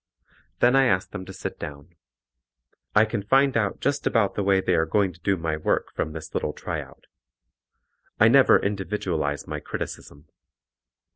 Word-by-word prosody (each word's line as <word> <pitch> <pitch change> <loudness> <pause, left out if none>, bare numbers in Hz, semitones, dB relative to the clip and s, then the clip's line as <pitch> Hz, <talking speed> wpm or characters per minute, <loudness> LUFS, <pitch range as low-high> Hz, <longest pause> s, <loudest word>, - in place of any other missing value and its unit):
Then 125 +2 +5
I 135 0 +5
ask 90 -6 +1
them 95 -2 -6
to 95 - -9
sit - - -6
down. 75 +3 -9 1.0
I 105 +1 +6
can 110 -2 -3
find 135 +6 +3
out 100 -4 0
just 140 +1 0
about 110 -4 +2
the - - -2
way 95 -1 +3
they 95 -1 0
are 80 -1 +2
going 95 +2 +1
to 85 - -20
do 95 +2 0
my 80 -2 -2
work 75 - -1
from 80 - -3
this 80 -1 -8
little - - -2
tryout. - - -7 1.1
I 110 - +7
never 130 +3 +6
individualize 95 -8 -2
my - - -5
criticism. 70 +2 -7
95 Hz, 165 wpm, -25 LUFS, 80-110 Hz, 1.1 s, I